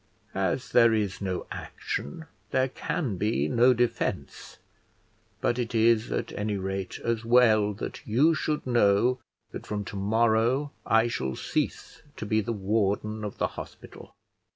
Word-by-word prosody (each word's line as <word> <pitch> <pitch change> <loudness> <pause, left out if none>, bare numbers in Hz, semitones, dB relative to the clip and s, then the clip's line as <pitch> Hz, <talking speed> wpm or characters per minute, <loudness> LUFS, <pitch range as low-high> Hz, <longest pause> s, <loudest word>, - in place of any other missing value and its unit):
As 95 +6 -1
there 115 -2 +5
is 105 -3 -2
no 95 -2 -3
action, 160 - -5 0.2
there 130 0 +1
can 125 - -3
be 105 +5 0
no 125 +1 +4
defence; 120 -1 -2 0.8
but 120 - +1
it 120 0 -3
is, 115 0 +3
at - - -2
any 105 0 -2
rate, 95 -1 -4
as 115 -1 -1
well 115 -3 +4
that 100 - -6
you 135 +10 +4
should 155 -1 -2
know 120 +1 +3 0.3
that - - -8
from 105 -1 -3
to - - -8
morrow 115 +7 +2 0.2
I 115 +1 +4
shall 65 - -3
cease - - -3 0.2
to - - -5
be 110 +1 +1
the 115 - -3
warden 105 +1 -1
of 105 - -5
the - - +1
hospital. - - -11
110 Hz, 150 wpm, -27 LUFS, 100-120 Hz, 0.8 s, there